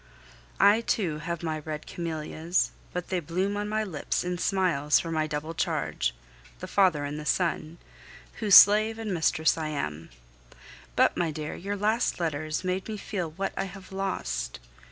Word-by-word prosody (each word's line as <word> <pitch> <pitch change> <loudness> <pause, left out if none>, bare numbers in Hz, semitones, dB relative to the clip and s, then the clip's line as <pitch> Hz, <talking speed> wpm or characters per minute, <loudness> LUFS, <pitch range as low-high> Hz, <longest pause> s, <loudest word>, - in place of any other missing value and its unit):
I 210 +3 +6
too 175 -9 -1
have 170 +1 -4
my 160 -1 -2
red 155 0 -6
camellias, 165 +1 -2 0.2
but 180 -1 -4
they 185 - 0
bloom 185 +5 -1
on 205 0 -2
my 215 0 0
lips 175 -8 -2
in 180 0 -3
smiles 175 -7 +2
for 165 - -4
my 155 -1 0
double 150 +2 -4
charge - - -1 0.4
the - - -7
father 180 -8 +2
and 145 +1 -4
the - - -6
son 170 -2 0 0.6
whose 210 -4 +5
slave 215 +2 +8
and 220 -3 -3
mistress 160 -1 +2
I 155 - -2
am. 80 - -4 0.9
But, - - +3
my 170 -2 +1
dear, 155 0 -5
your 200 +3 -4
last 215 +2 +1
letters 155 0 -2
made 185 +1 -2
me 215 -1 -4
feel 185 -5 -3
what 195 +5 -3
I - - -1
have 195 0 -11
lost! 60 - -3
170 Hz, 170 wpm, -27 LUFS, 155-195 Hz, 0.9 s, slave